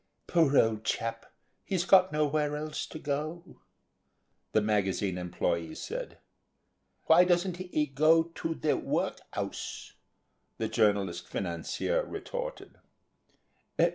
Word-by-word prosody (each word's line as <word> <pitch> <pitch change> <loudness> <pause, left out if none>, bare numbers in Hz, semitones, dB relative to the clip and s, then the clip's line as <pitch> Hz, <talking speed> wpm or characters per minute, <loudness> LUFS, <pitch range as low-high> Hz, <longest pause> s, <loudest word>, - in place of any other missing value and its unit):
"Poor 160 -5 +3
old 110 -1 +3
chap; 115 0 -3 0.3
he's 185 -2 -1
got 190 -1 +6
nowhere 150 0 +1
else 155 +1 -4
to - - -8
go 155 +3 -3
to," - - -17 0.9
the - - +4
magazine 100 -3 0
employee 85 -2 -2
said. - - -6 0.9
"Why 165 +2 +7
doesn't 180 0 +1
he 180 -4 -1
go 155 +4 +4
to 165 0 -4
the 155 - +1
work'ouse," - - -3 0.6
the 110 - -1
journalist 100 -6 +1
financier 95 - -2
retorted. - - -6
150 Hz, 110 wpm, -30 LUFS, 105-170 Hz, 0.9 s, Why